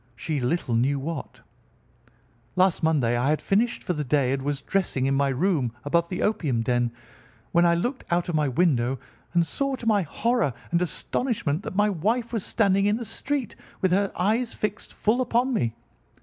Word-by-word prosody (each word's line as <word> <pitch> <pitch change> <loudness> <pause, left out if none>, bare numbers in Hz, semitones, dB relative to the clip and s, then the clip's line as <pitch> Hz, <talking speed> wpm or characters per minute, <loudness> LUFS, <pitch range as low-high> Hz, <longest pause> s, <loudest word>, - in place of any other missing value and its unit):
She 150 +4 -2
little 125 0 -1
knew 135 +5 +2
what. 155 +2 -6 1.1
"Last 185 -1 +3
Monday 145 -8 +2
I 125 +4 +1
had 155 - +2
finished 230 +5 +1
for 180 - -1
the 150 -2 -2
day 135 -1 +2
and 135 - -2
was 140 0 -3
dressing 175 -9 0
in 135 - +2
my 140 0 +2
room 135 - +1
above 170 +3 +1
the 180 - -2
opium 150 - 0
den 120 0 +1 0.6
when 170 0 +4
I 170 - +4
looked 245 +10 -2
out 175 0 +1
of 175 - -2
my 150 -2 +2
window 135 -3 +2 0.4
and 170 -1 +4
saw, 275 - -1
to 240 - -9
my 215 -3 +4
horror 230 - 0 0.2
and 170 0 +2
astonishment, 180 - -1
that 185 - -6
my 210 +1 +3
wife 225 +7 -1
was 220 -5 -1
standing 200 -2 +2
in 210 +1 +2
the 235 - -5
street, 270 +1 -3 0.2
with 185 - +1
her 195 +2 +2
eyes 225 +6 0
fixed 210 0 -3
full 230 +4 +1
upon 250 +1 +1
me. 115 - 0
175 Hz, 190 wpm, -25 LUFS, 140-210 Hz, 1.1 s, when